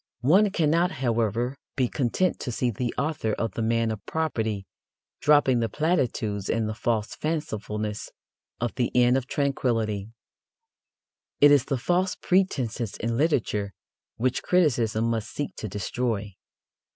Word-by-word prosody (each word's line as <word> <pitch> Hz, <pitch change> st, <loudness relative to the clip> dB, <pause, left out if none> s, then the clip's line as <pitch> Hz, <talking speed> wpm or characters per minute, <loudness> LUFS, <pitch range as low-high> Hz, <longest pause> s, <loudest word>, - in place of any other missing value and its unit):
One 195 Hz, +9 st, +5 dB
cannot, 170 Hz, 0 st, +2 dB
however, 120 Hz, 0 st, 0 dB, 0.2 s
be 130 Hz, -2 st, +2 dB
content 140 Hz, +10 st, 0 dB
to 125 Hz, -, -4 dB
see 120 Hz, +1 st, 0 dB
the 120 Hz, +2 st, -2 dB
author 140 Hz, -6 st, -1 dB
of 115 Hz, -1 st, -2 dB
The 115 Hz, -, -4 dB
Man 115 Hz, 0 st, +1 dB
of 105 Hz, -2 st, -6 dB
Property 110 Hz, -11 st, -1 dB, 0.5 s
dropping 145 Hz, -4 st, +4 dB
the 115 Hz, -1 st, 0 dB
platitudes 120 Hz, -, 0 dB
and 115 Hz, -1 st, +1 dB
the 110 Hz, -, -2 dB
false 110 Hz, -1 st, -1 dB
fancifulness 110 Hz, -9 st, -3 dB, 0.5 s
of 120 Hz, 0 st, -2 dB
The 120 Hz, -, +1 dB
Inn 125 Hz, 0 st, +5 dB
of 135 Hz, -1 st, -1 dB
Tranquillity. 115 Hz, -8 st, -1 dB, 1.3 s
It 145 Hz, 0 st, +8 dB
is 145 Hz, -4 st, +5 dB
the 135 Hz, -, -1 dB
false 180 Hz, +8 st, +1 dB
pretences 130 Hz, -, 0 dB
in 115 Hz, +1 st, -2 dB
literature 115 Hz, -, 0 dB, 0.4 s
which 125 Hz, +2 st, 0 dB
criticism 120 Hz, -11 st, +2 dB
must 115 Hz, -2 st, -1 dB
seek 145 Hz, -, -4 dB
to 110 Hz, -, -4 dB
destroy. 105 Hz, 0 st, -2 dB
120 Hz, 140 wpm, -26 LUFS, 110-145 Hz, 1.3 s, It